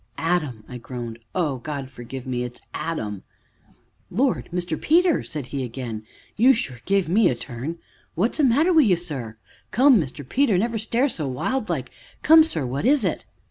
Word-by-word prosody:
"Adam!" 155 -10 -1
I 125 - -8
groaned. 120 -1 -7 0.2
"Oh, 155 -7 0
God 140 -1 -5
forgive 125 +1 -8
me, 125 -2 -2
it's 120 0 -7
Adam!" 110 - -3 0.9
"Lord! 250 +7 0
Mr. 175 -2 -3
Peter," 340 +1 +4
said 150 -4 -6
he 135 -2 -1
again, 115 -3 -6 0.3
"you 250 +5 +6
sure 130 - -4
give 195 -2 +2
me 210 +7 +4
a 125 - 0
turn, 125 +5 -5
Sir! - - -18
But - - -33
what's 220 +6 +1
the - - +4
matter 295 +9 +4
wi' 320 - +7
you, 205 -10 +4
sir? 135 -10 -6 0.3
Come, 255 -1 +5
Mr. 140 -1 -7
Peter, 250 - +2
never 225 +3 0
stare 235 +5 +1
so 160 - -3
wild 215 - -2
like - - -2 0.3
come, 320 0 +8
sir, 160 - -2
what 130 +3 -3
is 265 -1 +3
it?" 180 - -2
165 Hz, 185 wpm, -23 LUFS, -, 0.9 s, come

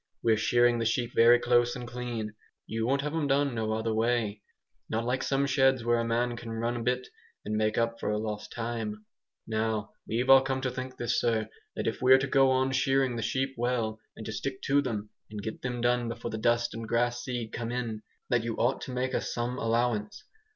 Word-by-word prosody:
We're 115 -1 +4
shearing 120 +2 +3
the 115 - 0
sheep 120 +2 0
very 120 +1 +7
close 120 0 +2
and 125 -1 -6
clean. 120 -3 -4 0.3
You 110 +1 -2
won't 140 +2 +2
have 150 +1 -3
'em 160 -3 0
done 140 -1 +2
no 110 -1 -2
otherways. 110 -1 0 0.5
Not 115 +1 -1
like 125 +2 0
some 140 0 +1
sheds 135 -2 +3
where 120 0 +3
a - - +1
man 120 +1 0
can 115 0 -8
'run' 115 +2 -1
a - - -3
bit 125 +2 0 0.4
and 105 - -2
make 110 0 +1
up 115 0 0
for 105 - -1
lost 105 -1 -4
time. 115 -2 -4 0.4
Now 110 -1 -1 0.2
we've 120 +4 -1
all 135 0 +9
come 135 0 -1
to 130 -1 -1
think 130 +1 -6
this, 120 0 0
sir, 110 -2 +1 0.3
that - - -3
if 115 - -2
we're 130 +1 +7
to 135 - 0
go 135 -1 +4
on 130 0 +2
shearing 135 -1 +2
the 115 - -3
sheep 130 +5 -1
well, 115 -3 -1 0.2
and 110 - -8
to 110 - -4
stick 130 +4 -4
to 140 +1 +3
them, 105 -6 -4 0.2
and 105 -1 -6
get 110 - -5
them 125 -1 -3
done 120 0 +2
before 115 0 -5
the 110 - -4
dust 120 +1 +2
and 115 0 -6
grass 120 +1 +1
seed 120 -3 -4
come 115 0 -3
in, 115 -3 -3 0.3
that 120 -2 +3
you 115 -1 -2
ought 125 +3 +1
to - - -6
make 130 +1 -1
us - - -1
some 120 +1 -2
allowance. 115 -2 0
120 Hz, 220 wpm, -29 LUFS, 110-125 Hz, 0.5 s, all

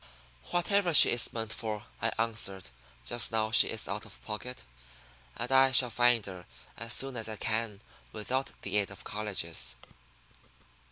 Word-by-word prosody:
"Whatever 175 -1 +1
she - - +11
is 120 -1 +2
meant 110 -1 -5
for," 105 -2 -6 0.2
I 115 +1 0
answered, 105 - -3 0.3
just 120 - 0
now 110 -1 -1
she 115 - +7
is 110 - -3
out 105 +2 -4
of 105 -2 -12
pocket. 125 +4 -7 0.7
And 120 +2 -4
I 135 0 +5
shall 125 -1 +5
find 120 -2 +2
her 90 -2 -10 0.3
as 115 +1 -6
soon 135 -1 -2
as 110 -1 -5
I 110 - -5
can 110 -1 -4 0.3
without 130 +5 -3
aid 105 -1 -2
of 100 - -10
the - - -28
colleges." 100 -6 -3
110 Hz, 160 wpm, -29 LUFS, 105-120 Hz, 0.7 s, she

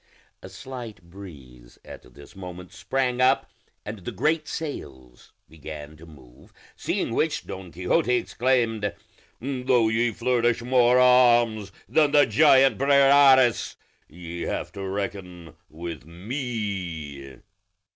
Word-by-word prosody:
A 95 - -11
slight 120 +2 -9
breeze 70 -10 -14
at 60 -1 -13
this 70 +6 -15
moment 90 -1 -10
sprang 125 +7 -2
up, 130 +2 +2 0.3
and 105 0 -7
the 90 - -7
great 155 0 -1
sails 65 - -8 0.2
began 75 -1 -10
to 85 +2 -15
move; 65 -6 -18 0.2
seeing - - -3
which, - - -1
Don 95 -2 -9
Quixote 90 - 0
exclaimed, 115 -5 0 0.4
"Though 125 -3 +1
ye 115 +2 +1
flourish 120 +1 0
more 125 0 +3
arms 120 -5 +4 0.2
than 145 +5 +2
the 145 -1 +6
giant 135 -6 +4
Briareus, 135 -2 +4 0.3
ye 85 +1 -9
have - - -4
to 100 -1 -7
reckon 95 -3 -6
with 85 -1 -8
me." 90 - -6
105 Hz, 115 wpm, -24 LUFS, 85-125 Hz, 0.4 s, the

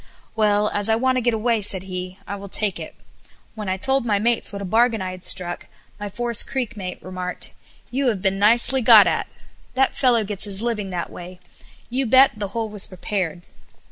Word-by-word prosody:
"Well, 210 -1 +2
as 205 +1 -1
I 220 - +4
want 255 +2 +1
to - - +1
get 240 -1 +1
away," 225 0 +1
said 190 -2 -3
he, 185 0 -6
"I 200 - -5
will 200 0 -9
take 205 0 +1
it." - - -8 0.6
When 210 -3 -5
I 185 - -1
told 265 +6 +1
my 215 -4 +1
mates 230 +3 +1
what 200 - -6
a 200 - -5
bargain 225 +3 +2
I 185 -1 -4
had 185 0 -10
struck, 175 -2 -2 0.3
my 205 0 -5
Forest 235 +2 +1
Creek 245 -4 -3
mate 185 -3 -6
remarked, 185 -1 -5 0.4
"You 270 +2 0
have 220 -5 +1
been 195 +1 0
nicely 235 +5 +3
got 225 - +8
at! - - 0 0.5
That 265 0 +2
fellow 245 -4 +3
gets 205 0 0
his 200 +1 0
living 215 -5 -2
that 175 -2 -4
way. 180 +1 -10 0.5
You 260 +1 0
bet, 260 +4 +6
the 210 -1 -4
hole 225 +3 -3
was 210 -2 -2
prepared." 180 -2 -4
210 Hz, 205 wpm, -22 LUFS, 190-235 Hz, 0.6 s, got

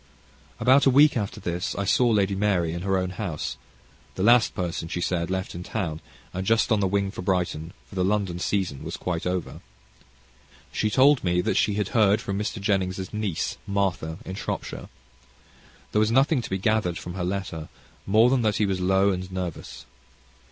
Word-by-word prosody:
About 130 +4 +5
a - - +8
week 145 +3 +6
after 105 -4 -3
this 90 +1 -3
I 100 - -2
saw 120 +5 +3
Lady 100 -3 +2
Mary 95 -5 +1
at 85 - -4
her 95 0 +1
own 90 -1 -1
house, 90 -5 -4 0.6
the 95 - -2
last 120 +2 +5
person, 85 -3 -3
she 90 - -3
said, 85 -1 -1
left 95 0 -3
in 85 - -6
town, 90 -5 -3 0.3
and 95 - -3
just 115 +4 +2
on 110 - +4
the 100 - +2
wing 100 0 0
for 95 - -7
Brighton, 90 -3 -1
for - - -17
the 95 -1 0
London 95 -3 0
season 90 -7 -1
was - - -5
quite 90 -1 -3
over. 90 -1 -3 1.1
She 110 - 0
told 135 +4 +4
me 90 -1 +1
that - - 0
she 105 - +2
had 105 -2 -1
heard 105 -2 +4
from 100 0 -3
Mr. 105 +1 -3
Jenning's 95 -2 -1
niece, 105 -6 -2
Martha, 95 -5 -1
in 95 - -5
Shropshire. 95 - -5 1.0
There 105 - +2
was 110 0 +3
nothing 135 +3 +3
to - - -7
be 95 - -1
gathered 100 -4 0
from 90 - -7
her 90 -1 -3
letter, 90 -4 -4 0.4
more 110 +5 +5
than 130 -2 +3
that 105 -2 +1
he 105 - +2
was 95 -2 -1
low 95 +2 +3
and 90 0 -4
nervous. 90 -3 -6
95 Hz, 195 wpm, -25 LUFS, 90-105 Hz, 1.1 s, a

